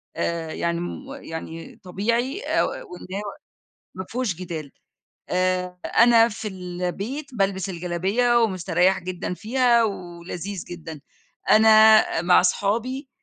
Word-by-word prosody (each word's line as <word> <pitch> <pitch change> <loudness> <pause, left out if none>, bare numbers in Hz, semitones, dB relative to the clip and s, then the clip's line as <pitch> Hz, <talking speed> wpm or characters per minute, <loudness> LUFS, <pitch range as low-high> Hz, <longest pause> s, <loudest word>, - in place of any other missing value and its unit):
آآ 165 -2 -2
يعني 170 0 -1
م 270 +10 -6
يعني 160 0 -8
طبيعي 235 - -1
أ - - +1
وإنه 185 +3 -6 0.7
ما 190 0 -6
فيهوش 240 -7 -2
جدال. 165 -5 -7 0.6
آآ 180 0 0
أنا 235 -1 +5
في 215 0 -6
البيت 185 +9 -5
بالبس 195 -2 0
الجلابية 190 +8 +1
ومستريح 185 -2 +2
جدًا 180 0 -5
فيها 235 +2 +2
ولذيذ 180 -1 -6
جدًا، 160 -3 -8 0.5
أنا 220 -4 +6
مع 180 +1 +5
أصحابي 235 +9 -1
190 Hz, 110 wpm, -23 LUFS, 175-225 Hz, 0.7 s, أنا